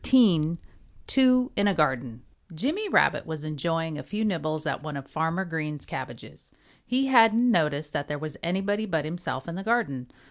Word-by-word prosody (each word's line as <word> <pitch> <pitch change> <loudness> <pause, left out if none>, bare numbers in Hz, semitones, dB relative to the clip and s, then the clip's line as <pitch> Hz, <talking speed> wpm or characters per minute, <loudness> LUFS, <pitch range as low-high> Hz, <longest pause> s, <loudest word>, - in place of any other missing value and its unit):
XIII 170 -11 +4 0.5
TWO 255 0 +4
IN 200 0 +2
A 200 - +2
GARDEN 130 -6 0 0.3
Jimmy 325 - -1
Rabbit - - +3
was 160 -2 -5
enjoying 160 +1 -2
a - - -6
few 215 +1 -2
nibbles 155 -5 -2
at 155 - -2
one 150 -1 -5
of 135 - -7
Farmer 165 +5 -1
Green's 155 -3 -4
cabbages. - - -8 0.3
He 260 +2 +1
hadn't 235 -2 +5
noticed 150 -4 +1
that 145 - -2
there 150 - -3
was 155 0 -6
anybody 195 +5 -1
but 160 -5 -1
himself 160 -4 -4
in 170 - -4
the 190 +3 -5
garden. 195 - 0
165 Hz, 175 wpm, -26 LUFS, 150-215 Hz, 0.5 s, hadn't